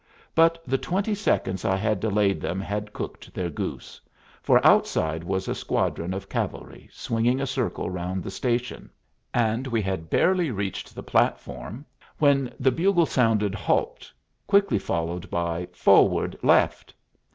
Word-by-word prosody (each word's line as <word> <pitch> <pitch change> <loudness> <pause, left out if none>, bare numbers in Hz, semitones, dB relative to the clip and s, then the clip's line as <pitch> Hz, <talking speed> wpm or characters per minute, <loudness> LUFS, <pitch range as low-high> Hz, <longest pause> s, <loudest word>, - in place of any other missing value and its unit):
But 165 +1 +4
the 135 0 0
twenty 200 +4 -1
seconds 95 - 0
I 95 - +2
had 105 +1 0
delayed 105 -1 +1
them 90 - -2
had 105 +1 -4
cooked - - -8
their 90 -2 -2
goose, - - -6 0.4
for - - +4
outside 80 +1 +3
was 95 +2 -2
a - - 0
squadron 85 +2 -1
of 95 +1 -5
cavalry - - -5
swinging 120 +1 0
a 135 - -1
circle 130 -2 -2
round 90 0 -3
the - - -6
station; 120 +4 -2 0.4
and 120 +2 0
we 115 -3 0
had 95 -4 -3
barely 180 - +2
reached 100 -4 -4
the - - -7
platform 65 - -1 0.3
when 140 -4 +3
the 130 0 +3
bugle 175 +4 +3
sounded 110 -7 +1
"Halt," 105 - -1 0.4
quickly 200 - +3
followed 85 0 -3
by 85 0 -2
"Forward - - +3
left." - - +2
105 Hz, 145 wpm, -25 LUFS, 95-135 Hz, 0.4 s, But